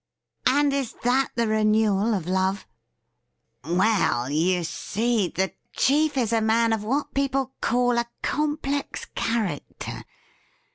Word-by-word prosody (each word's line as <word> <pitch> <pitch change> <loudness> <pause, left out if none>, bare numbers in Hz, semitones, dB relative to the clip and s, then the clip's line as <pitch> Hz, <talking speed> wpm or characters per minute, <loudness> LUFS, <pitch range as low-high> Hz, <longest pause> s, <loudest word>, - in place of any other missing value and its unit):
' - - -55
And 285 +2 +3
is 275 -4 -2
that 255 +2 +2
the 235 -1 +1
renewal 215 0 +2
of 180 -5 -3
love 190 +2 0 1.0
T 165 - -4
' - - +2
Well, 185 - +2
you 175 +4 +1
see, 220 +4 -1
the 190 +2 -2 0.2
chief 295 +1 +2
is 230 -3 +1
a 225 - +3
man 225 +1 +3
of 220 -2 -2
what 270 +7 -1
people 270 -1 0
call 245 0 +2
a 235 0 -2
complex 295 -1 -2
character. 215 -10 -3
225 Hz, 140 wpm, -25 LUFS, 195-265 Hz, 1.0 s, And